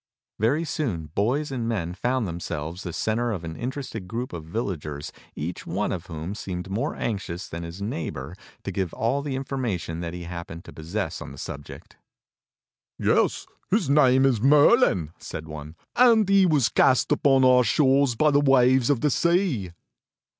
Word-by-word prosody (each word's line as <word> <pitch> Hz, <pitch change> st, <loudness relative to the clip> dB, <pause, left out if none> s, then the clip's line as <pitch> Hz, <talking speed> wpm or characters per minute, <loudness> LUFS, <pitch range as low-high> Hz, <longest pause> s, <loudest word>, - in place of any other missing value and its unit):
Very 140 Hz, +10 st, +2 dB
soon 105 Hz, -, -3 dB
boys 135 Hz, +10 st, 0 dB
and 120 Hz, -4 st, -2 dB
men 90 Hz, -7 st, -2 dB
found 120 Hz, +4 st, -1 dB
themselves 85 Hz, 0 st, -5 dB
the 90 Hz, -, -5 dB
centre 115 Hz, +7 st, -1 dB
of 95 Hz, -6 st, -4 dB
an 80 Hz, -1 st, -6 dB
interested 125 Hz, -, -5 dB
group 120 Hz, +3 st, -4 dB
of 80 Hz, -3 st, -6 dB
villagers 80 Hz, -6 st, -4 dB, 0.2 s
each 85 Hz, +4 st, -5 dB
one 100 Hz, +5 st, -1 dB
of 85 Hz, -2 st, -5 dB
whom 80 Hz, +3 st, -5 dB
seemed 95 Hz, -3 st, -6 dB
more 105 Hz, +4 st, -1 dB
anxious 95 Hz, -5 st, -4 dB
than 85 Hz, -, -6 dB
his 85 Hz, +4 st, -7 dB
neighbor 80 Hz, -, -4 dB, 0.3 s
to 100 Hz, -, -4 dB
give 95 Hz, -2 st, -3 dB
all 125 Hz, +5 st, 0 dB
the 140 Hz, -2 st, -3 dB
information 120 Hz, -12 st, -3 dB
that 85 Hz, 0 st, -5 dB
he 90 Hz, -, -6 dB
happened 85 Hz, -1 st, -7 dB
to -, -, -11 dB
possess 90 Hz, +6 st, -4 dB
on -, -, -7 dB
the -, -, -11 dB
subject. 70 Hz, 0 st, -9 dB, 1.0 s
"Yes, -, -, +1 dB, 0.2 s
his 135 Hz, -, +1 dB
name 135 Hz, -2 st, +5 dB
is 125 Hz, -6 st, +2 dB
Merlin," 140 Hz, -, +5 dB
said 80 Hz, 0 st, -7 dB
one, 75 Hz, 0 st, -8 dB, 0.2 s
"and 230 Hz, -4 st, +5 dB
he 195 Hz, -1 st, +5 dB
was 150 Hz, -7 st, +3 dB
cast 130 Hz, -, +3 dB
upon 135 Hz, -2 st, +4 dB
our 125 Hz, 0 st, +6 dB
shores 135 Hz, +2 st, +3 dB
by 150 Hz, +6 st, +3 dB
the 145 Hz, 0 st, +4 dB
waves 130 Hz, -2 st, +4 dB
of 140 Hz, -5 st, +2 dB
the 150 Hz, -, +2 dB
sea." 170 Hz, -, +1 dB
110 Hz, 170 wpm, -25 LUFS, 85-135 Hz, 1.0 s, our